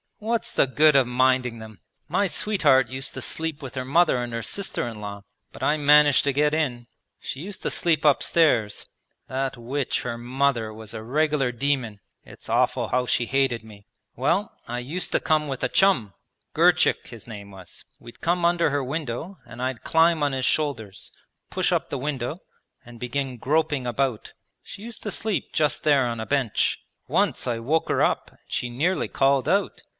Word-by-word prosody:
What's 230 +1 -2
the - - +3
good 150 +3 +4
of 135 -3 +5
minding 125 -1 +2
them? 110 -3 -11 0.3
My 200 - +1
sweetheart 145 - +2
used 130 +1 -5
to - - -5
sleep 160 -2 -2
with 130 - -7
her 130 -1 -4
mother 150 -2 +3
and 120 -1 -5
her 115 0 -3
sister 195 - -3
in 115 -2 -7
law, 100 -1 -7 0.3
but - - -9
I 150 - +2
managed 150 -1 +5
to 140 - +1
get 150 +2 +2
in. 130 -7 -1 0.3
She 135 - -6
used 190 +5 -7
to - - -1
sleep 160 -3 +1
upstairs; 140 -7 +2 0.4
that 130 0 -2
witch 130 +3 -2
her 120 -1 -4
mother 125 -2 0
was 110 0 -10
a 110 - -6
regular 145 +1 +1
demon; 125 -4 -2 0.2
it's - - -14
awful - - +1
how 125 0 0
she 120 - +1
hated 135 -3 +1
me. 105 -2 -15 0.3
Well, 150 - 0
I 120 +1 -3
used 150 +9 -3
to - - +3
come 155 -1 +1
with 135 -2 -4
a - - +1
chum, 155 - +3 0.4
Girchik - - +3
his 115 -3 -11
name 100 -3 -9
was. 95 -2 -12
We'd 120 0 -14
come 175 +1 +1
under 170 0 +3
her 140 -1 -1
window 150 +5 -4
and 120 - -10
I'd 130 -1 -3
climb 165 0 +3
on 145 -2 +1
his 130 -1 -1
shoulders, 120 -12 -2 0.4
push - - 0
up - - 0
the 140 - -3
window 140 +1 -3 0.5
and 120 -1 -13
begin 125 +1 -3
groping 145 0 0
about. 125 -2 -2 0.3
She 200 - -10
used 230 -1 -7
to 210 - -3
sleep 215 -1 -2
just 150 -2 0
there 145 -4 +4
on 115 -1 -3
a 110 - -5
bench. 135 -6 +1 0.3
Once - - 0
I 120 -2 0
woke 150 +8 0
her - - +2
up - - 0
and - - -26
she 120 - -2
nearly 155 +10 0
called 135 -1 +2
out. 200 +2 0
135 Hz, 190 wpm, -24 LUFS, 120-155 Hz, 0.5 s, of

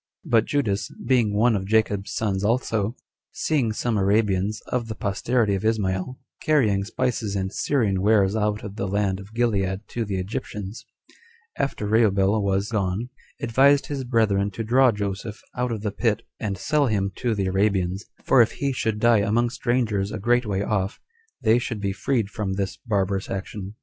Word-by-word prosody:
3. 160 - -12
But 115 -2 +5
Judas, 115 -7 0 0.2
being 120 -5 +3
one 115 +1 +4
of 95 -1 -3
Jacob's 105 -2 +1
sons 100 -3 -1
also, 115 -1 0 0.4
seeing 135 -8 0
some 110 +1 -1
Arabians, 100 0 +1
of 120 -2 -1
the 110 - -5
posterity 105 +2 0
of 95 - -2
Ismael, 110 +2 0 0.2
carrying 110 -11 +2
spices 110 -1 -2
and 95 0 -2
Syrian 105 -10 +1
wares 100 -1 +3
out 105 -1 0
of 105 0 -7
the 100 - -2
land 100 -1 0
of 100 +1 -11
Gilead 100 -5 0
to 120 - -2
the 100 -3 -3
Egyptians, 100 +2 -5 0.7
after 135 -6 -2
Rubel 105 -1 +3
was 100 0 0
gone, 100 +2 -1 0.3
advised 135 +4 +4
his 140 -2 -4
brethren 110 -5 +2
to 115 - -4
draw 125 +3 +4
Joseph 105 +1 -4 0.2
out 125 0 -1
of 110 -3 -3
the 105 - -1
pit, 110 0 0 0.2
and 100 -3 -3
sell 145 +9 +1
him 100 -3 0
to 120 -3 0
the 100 -2 -1
Arabians; 95 -1 +1 0.2
for 130 - +5
if 115 - +2
he 140 -1 -1
should 110 -3 -1
die 115 0 +4
among 115 +4 +1
strangers 115 -6 0
a 110 - -3
great 120 +3 +1
way 100 -1 -1
off, 100 0 -1 0.4
they 110 +2 +4
should 115 -2 -4
be 100 -1 -1
freed 115 +1 0
from 100 -2 -2
this 95 -1 -2
barbarous 100 -4 -1
action. 95 +1 -5
105 Hz, 175 wpm, -24 LUFS, 100-115 Hz, 0.7 s, But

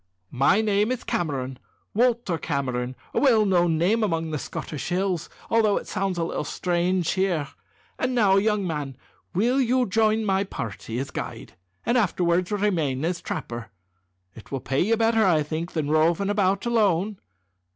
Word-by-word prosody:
"My 140 - +4
name 210 +1 +1
is 255 - -3
Cameron 135 -6 -2 0.3
Walter 230 -7 +1
Cameron 130 -4 -2 0.2
a - - +2
well 230 -6 +4
known 175 -4 +3
name 210 +8 +2
among 165 -5 -1
the 150 - -2
Scottish 150 +1 -5
hills, 185 -1 -1 0.2
although 220 -3 +3
it - - -5
sounds 190 -1 -2
a 170 - 0
little 165 - -2
strange 175 +2 0
here. 180 -7 0 0.5
And 255 0 0
now, 200 -5 +4
young 210 -1 +1
man, 145 -6 -4 0.4
will 245 +8 +2
you 255 0 +2
join 220 +1 +2
my 195 -1 +2
party 115 - -6
as 135 +2 -3
guide, - - -6 0.3
and 245 +1 +3
afterwards 180 -3 +1
remain 165 -10 0
as 175 0 -2
trapper? 115 -1 -5 0.6
It 110 - -14
will 135 - -2
pay 135 +2 -1
you 225 +5 +2
better, 225 0 +3
I 165 -6 +3
think, 160 +3 -4
than 150 -3 -1
roving 170 +6 +2
about 200 0 +1
alone." 210 -4 +1
185 Hz, 160 wpm, -25 LUFS, 155-215 Hz, 0.6 s, My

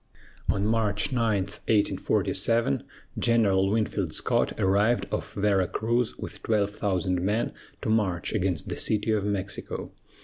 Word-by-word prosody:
On 100 - +1
March 110 +4 +1
9, 115 -6 +2
1847, 100 -2 +1 0.4
General 100 -5 +3
Winfield 100 -5 0
Scott - - +2
arrived 100 +5 +3
off - - -3
Vera 100 -2 +2
Cruz 115 +4 0
with - - -8
twelve 105 -2 +1
thousand 95 -3 0
men 105 +5 0 0.3
to - - -1
march 95 -6 0
against 95 -5 -1
the - - -4
City 110 +1 0
of 105 -2 +1
Mexico. 100 -1 -3
105 Hz, 130 wpm, -27 LUFS, 95-110 Hz, 0.4 s, General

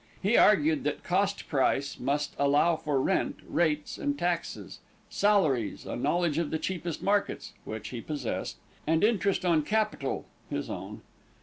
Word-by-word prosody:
He 210 +5 +2
argued 295 +6 +5
that - - -2
"cost 200 +2 0
price" 140 0 +1
must 145 +3 -1
allow 145 +4 +4
for 150 -3 -1
rent, 190 +8 +1
rates 155 -3 0
and 285 -1 -1
taxes; 175 -4 -3 0.3
salaries, 155 - +2
a - - -4
knowledge 160 +4 +1
of 170 - -1
the 160 - -1
cheapest 170 0 -4
markets 200 0 0
(which 110 -1 -6
he 120 -2 -5
possessed) 145 -5 -4 0.3
and 160 +1 +2
interest 200 -4 +2
on 170 -3 +4
capital 215 +6 -1 0.2
(his - - -3
own). - - -7
165 Hz, 145 wpm, -29 LUFS, 145-200 Hz, 0.3 s, argued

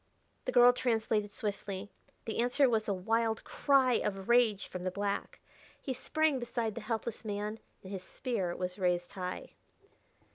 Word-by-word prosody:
The - - 0
girl 245 0 +7
translated 220 -4 0
swiftly; 200 -1 -4 0.3
the 225 - -3
answer 250 +4 +4
was 220 -2 +1
a - - +3
wild 220 +4 0
cry 265 -4 +3
of 195 -2 -3
rage 235 -4 +4
from 185 - -6
the 185 - -1
black. 200 +2 -3 0.4
He 265 - -3
sprang 305 +2 +1
beside 235 -2 -2
the 235 - -6
helpless 225 +1 -3
man 210 +1 -3 0.2
and 190 - -9
his 190 -2 -4
spear 195 -5 -3
was 180 +1 -4
raised 175 -1 +1
high. 180 -1 -5
220 Hz, 155 wpm, -32 LUFS, 195-240 Hz, 0.4 s, girl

